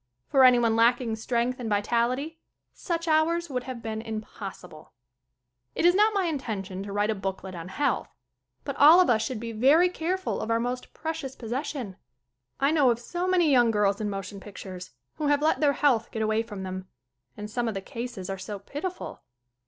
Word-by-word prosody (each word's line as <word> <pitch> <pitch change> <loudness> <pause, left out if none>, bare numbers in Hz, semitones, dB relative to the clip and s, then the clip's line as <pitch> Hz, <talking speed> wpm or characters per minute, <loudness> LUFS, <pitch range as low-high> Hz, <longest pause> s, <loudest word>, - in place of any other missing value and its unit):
For 270 -2 +4
anyone 240 -3 +5
lacking 235 0 +3
strength 240 +2 -1
and 235 -3 -4
vitality 240 +9 0 0.3
such 335 -1 -3
hours 325 +1 +2
would 250 -1 -2
have 250 -3 -7
been 220 -1 -3
impossible. 215 -7 -8 0.8
It - - 0
is 350 - +7
not 420 +2 +3
my 390 -2 +2
intention 215 - -3
to 200 0 -6
write 205 +2 +1
a - - +1
booklet 190 -1 -5
on 170 0 -7
health. 285 +10 -1 0.5
But - - -4
all 315 +5 +8
of 365 - +5
us 220 -2 +2
should 255 -5 -3
be 230 0 -5
very 280 +11 +5
careful 365 +2 -2
of - - -4
our 230 0 +2
most 245 +2 -3
precious 300 -4 -4
possession. 250 -3 -4 0.6
I 275 +2 +3
know 290 -5 +4
of 235 - +2
so 350 +10 -4
many 355 -4 +3
young 245 -3 +5
girls 210 -2 +1
in 210 - -1
motion 195 0 -6
pictures 190 -2 -9 0.3
who 300 - -1
have 290 0 +2
let 315 - +2
their 290 -2 +3
health 255 -6 +2
get 220 - -3
away 215 +1 +1
from 210 -4 -7
them. 185 0 -6 0.5
And 210 - -5
some 235 +3 -2
of 220 - -2
the - - -1
cases 230 -2 -6
are 195 -1 -4
so 205 +2 -5
pitiful. 295 - -6
235 Hz, 190 wpm, -27 LUFS, 210-290 Hz, 0.8 s, all